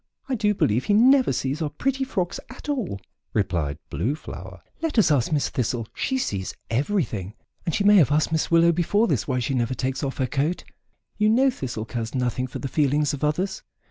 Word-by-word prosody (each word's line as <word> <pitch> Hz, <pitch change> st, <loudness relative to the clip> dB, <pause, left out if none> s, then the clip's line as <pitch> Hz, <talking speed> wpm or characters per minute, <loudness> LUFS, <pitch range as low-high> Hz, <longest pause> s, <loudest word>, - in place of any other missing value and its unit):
I 270 Hz, -, -2 dB
do 210 Hz, -3 st, +1 dB
believe 115 Hz, -, +1 dB
he 205 Hz, -, +3 dB
never 260 Hz, +4 st, +5 dB
sees 135 Hz, +4 st, -2 dB
our 155 Hz, -, 0 dB
pretty 265 Hz, -, -1 dB
frocks 185 Hz, -9 st, -2 dB
at 255 Hz, +3 st, -11 dB
all," 245 Hz, -, -2 dB, 0.4 s
replied 85 Hz, -8 st, 0 dB
Blue 120 Hz, -, -1 dB
Flower. 155 Hz, -, -10 dB, 0.2 s
"Let 325 Hz, -5 st, -2 dB
us 205 Hz, -7 st, +5 dB
ask 135 Hz, -3 st, +2 dB
Miss 150 Hz, -2 st, +1 dB
Thistle; 120 Hz, -2 st, -2 dB
she 265 Hz, -, -1 dB
sees 100 Hz, -, -3 dB, 0.2 s
everything 115 Hz, -, -1 dB, 0.3 s
and 165 Hz, -, +1 dB
she 205 Hz, -, +1 dB
may 205 Hz, 0 st, +7 dB
have 150 Hz, -6 st, +5 dB
asked 155 Hz, +2 st, +2 dB
Miss 160 Hz, -1 st, 0 dB
Willow 170 Hz, 0 st, +5 dB
before 180 Hz, +6 st, +2 dB
this 130 Hz, -, 0 dB
why 125 Hz, -, 0 dB
she 125 Hz, +2 st, -1 dB
never 125 Hz, 0 st, 0 dB
takes 130 Hz, +3 st, -2 dB
off 135 Hz, -1 st, -3 dB
her 130 Hz, -, +1 dB
coat; 145 Hz, +7 st, -1 dB, 0.6 s
you 210 Hz, 0 st, +4 dB
know 260 Hz, +4 st, +4 dB
Thistle 120 Hz, -, -5 dB
cares 115 Hz, +1 st, -4 dB
nothing 125 Hz, 0 st, -1 dB
for 125 Hz, -, -7 dB
the 135 Hz, -, -4 dB
feelings 145 Hz, +2 st, +1 dB
of 145 Hz, -, -5 dB
others." 180 Hz, +6 st, 0 dB
150 Hz, 205 wpm, -24 LUFS, 125-205 Hz, 0.6 s, may